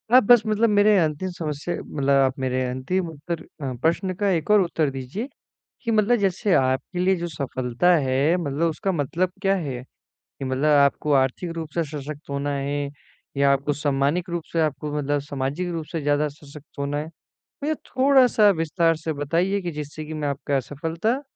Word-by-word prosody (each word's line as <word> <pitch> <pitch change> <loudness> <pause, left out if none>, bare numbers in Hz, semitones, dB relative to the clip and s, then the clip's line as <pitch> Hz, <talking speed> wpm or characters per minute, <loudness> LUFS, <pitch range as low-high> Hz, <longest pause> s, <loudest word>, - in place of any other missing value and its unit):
आप 255 - +8
बस 240 +2 +7
मतलब 215 +2 +2
मेरे 205 0 +5
अंतिम 160 +3 0
समस्या 155 +1 -3
मतलब 140 -2 -2 0.2
आप 130 +1 -2
मेरे 130 0 0
अंतिम 165 +8 -2
उत्तर 160 +2 -5 0.2
अ, 135 -2 -3
प्रश्न 180 +4 +1
का 200 +2 0
एक 165 -3 0
और 210 -1 +6
उत्तर 165 -4 0
दीजिए 135 - -5 0.6
कि 230 - 0
मतलब 220 +2 +3
जैसे 195 +1 0
आपके 130 +7 +1
लिए 185 +1 +3
जो 175 0 -3
सफलता 140 +2 0
है 140 +3 +2
मतलब 165 -1 0
उसका 190 +4 -2
मतलब 170 +4 -1
क्या 195 -1 +3
है? 135 -9 -4 0.4
कि 135 - -10
मतलब 130 +2 -1
आपको 140 +2 +2
आर्थिक 135 +6 +1
रूप 160 -2 -4
से 170 - +2
सशक्त 150 0 -7
होना 140 +1 -2
है? 140 +1 -2 0.5
या 140 0 +4
आपको 140 +2 +1
सम्मानित 145 +5 0
रूप 170 -1 -3
से 165 - +1
आपको 150 -1 -1
मतलब 145 0 0
सामाजिक 145 +5 -3
रूप 165 -2 -4
से 165 - -2
ज़्यादा 145 +1 +1
सशक्त 145 0 -14
होना 140 +1 -1
है? 150 +2 -4 0.5
भैया 305 +2 +1
थोड़ा-सा 255 -5 +4
विस्तार 165 +1 +2
से 160 0 -3
बताइए 170 +7 0
कि 175 -2 -3
जिससे 150 0 -6
कि 155 - -7
मैं 150 -2 -2
आपका 140 0 -1
असफलता 165 - -2
155 Hz, 185 wpm, -24 LUFS, 140-180 Hz, 0.6 s, आप